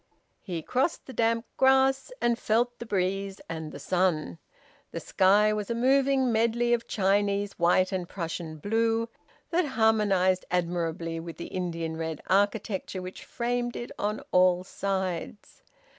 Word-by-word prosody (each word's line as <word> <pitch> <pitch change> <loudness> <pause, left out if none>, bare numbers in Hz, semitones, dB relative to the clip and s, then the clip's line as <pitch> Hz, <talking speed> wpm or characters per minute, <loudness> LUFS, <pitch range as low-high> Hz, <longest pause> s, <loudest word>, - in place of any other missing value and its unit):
He 170 -5 -5
crossed 260 - 0
the 260 - -9
damp 230 0 +1
grass, 265 - +3
and 240 0 +1
felt 240 +3 +1
the 235 - -7
breeze 195 0 -1
and 160 -2 -5
the - - -8
sun. 175 - 0 0.5
The - - -5
sky 205 +3 +3
was 210 -1 -3
a 235 - -1
moving 265 +1 +3
medley 235 +2 +2
of 235 0 -1
Chinese 200 0 +1
white 180 +2 +3
and 185 -2 -3
Prussian 165 -3 -5
blue, 225 +5 0 0.4
that 350 +1 +2
harmonised 200 -5 +3
admirably 170 -1 -1
with 165 0 -8
the - - -7
Indian 165 -3 -3
red 160 -2 -4
architecture 200 -1 0
which 185 0 -8
framed 240 0 -2
it 240 - -6
on 210 +1 -1
all 180 0 +4
sides. 190 0 -4
200 Hz, 145 wpm, -27 LUFS, 180-230 Hz, 0.5 s, all